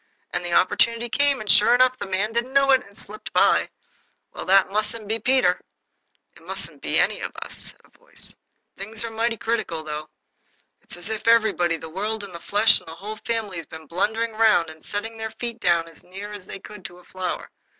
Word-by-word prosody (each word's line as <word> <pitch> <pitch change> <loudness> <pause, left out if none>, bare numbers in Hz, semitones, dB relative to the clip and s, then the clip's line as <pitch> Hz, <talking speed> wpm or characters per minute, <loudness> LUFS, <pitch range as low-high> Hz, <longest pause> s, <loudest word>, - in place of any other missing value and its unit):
And - - -1
the 175 -1 -2
opportunity 230 +6 +3
came, 285 +2 +3
and, 215 - +3
sure 210 +3 +6
enough, 255 0 +4
the - - -4
man 195 +3 0
didn't 240 +3 -1
know 275 0 +5
it, 260 -1 +6
and 200 - -15
it 200 - -16
slipped 215 +1 -7
by. - - +4 0.6
Well, - - -6
that 195 0 +5
mustn't 215 +1 -1
be 220 +2 0
Peter." 260 +4 +3 0.7
"It - - -16
musn't - - -2
be - - +1
any - - +2
of - - -4
us," - - -8
said - - -9
a - - -26
voice. - - -9 0.4
"Things 215 +3 -3
are 230 - -4
mighty 225 +1 0
critical, 210 -9 -2
though. 155 0 -5 0.7
It's - - -10
as 175 +4 -7
if 220 0 -4
everybody, 215 -7 +4
the 160 - -8
world 205 +6 -3
and 195 -3 -8
the 170 - -7
flesh 205 +5 +4
and - - -20
the 160 - -8
Whole 210 +5 -7
Family, 220 -5 -1
had 165 - -7
been 160 0 -9
blundering 220 +8 0
round 215 -7 +3
and 155 0 -15
setting 225 +2 -4
their 220 0 -5
feet 235 -1 -4
down 170 -3 +2
as 165 - -11
near 195 +3 -8
as 205 -3 -9
they - - -6
could 200 0 -11
to 175 - -8
a 180 - -17
flower. 185 +1 -4
210 Hz, 220 wpm, -24 LUFS, 180-230 Hz, 0.7 s, sure